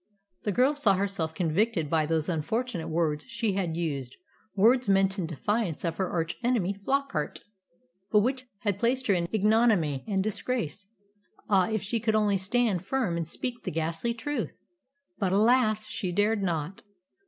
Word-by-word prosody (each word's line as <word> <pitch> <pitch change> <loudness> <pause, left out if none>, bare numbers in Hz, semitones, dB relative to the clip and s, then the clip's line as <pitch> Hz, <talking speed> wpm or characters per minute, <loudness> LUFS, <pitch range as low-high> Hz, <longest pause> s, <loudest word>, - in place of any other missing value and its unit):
The 205 - +1
girl 255 +7 +3
saw 235 -10 +3
herself 185 -5 -2
convicted 175 +1 +1
by 155 0 +1
those 160 -1 0
unfortunate 180 +3 -2
words 155 -2 0
she 230 -4 -1
had 175 -4 -1
used 140 -7 -3 0.4
words 230 +3 +4
meant 195 0 +3
in 170 - -1
defiance 180 - -2
of 165 -1 -2
her 190 - -1
arch 165 -1 -2
enemy 230 -6 +1
Flockart, 200 - -2 0.7
but 210 - +5
which 255 +3 -1 0.2
had 205 -3 -1
placed 255 +3 +1
her 205 - +3
in 170 -2 0
ignominy 210 - +3
and 195 -3 +1
disgrace. 210 -3 -3 0.6
Ah, 190 -2 +4
if 220 -2 -1
she 230 +4 -1
could 220 -1 +1
only 210 -2 +3
stand 195 -1 +1
firm 225 -5 -1
and 165 -2 -2
speak 240 +7 -4
the - - -2
ghastly 165 +9 -2
truth! 290 +6 -3 0.6
But, 190 -2 +1
alas! 215 0 +3
she 185 - -3
dared 205 +3 +2
not. 170 -1 -2
200 Hz, 165 wpm, -28 LUFS, 170-230 Hz, 0.7 s, but